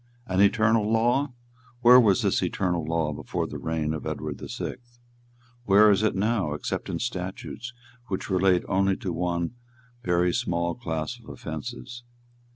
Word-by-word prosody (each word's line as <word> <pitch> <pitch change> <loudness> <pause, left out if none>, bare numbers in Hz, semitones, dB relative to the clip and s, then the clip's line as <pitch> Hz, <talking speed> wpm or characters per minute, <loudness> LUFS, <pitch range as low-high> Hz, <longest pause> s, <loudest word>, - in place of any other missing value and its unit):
"An 95 -3 +1
eternal 110 +1 +3
law! 120 +5 +2 0.5
Where 125 +1 +9
was 105 -6 +4
this - - +2
eternal 90 -3 -1
law 80 -1 -1
before - - -3
the - - -6
reign 80 -1 -1
of 80 - -5
Edward - - -4
the - - -8
Sixth? 120 -1 -7 0.7
Where 105 +1 +6
is 100 0 +3
it 110 - +1
now, 100 -5 0
except - - -4
in - - -2
statutes 120 +3 -5 0.4
which 95 - -3
relate 95 -2 +3
only 95 0 +2
to 90 - -4
one 85 0 -1 0.5
very 90 0 +2
small 85 0 0
class 85 +2 -4
of 115 - -15
offences. 120 +8 -7
95 Hz, 155 wpm, -26 LUFS, 85-115 Hz, 0.7 s, Where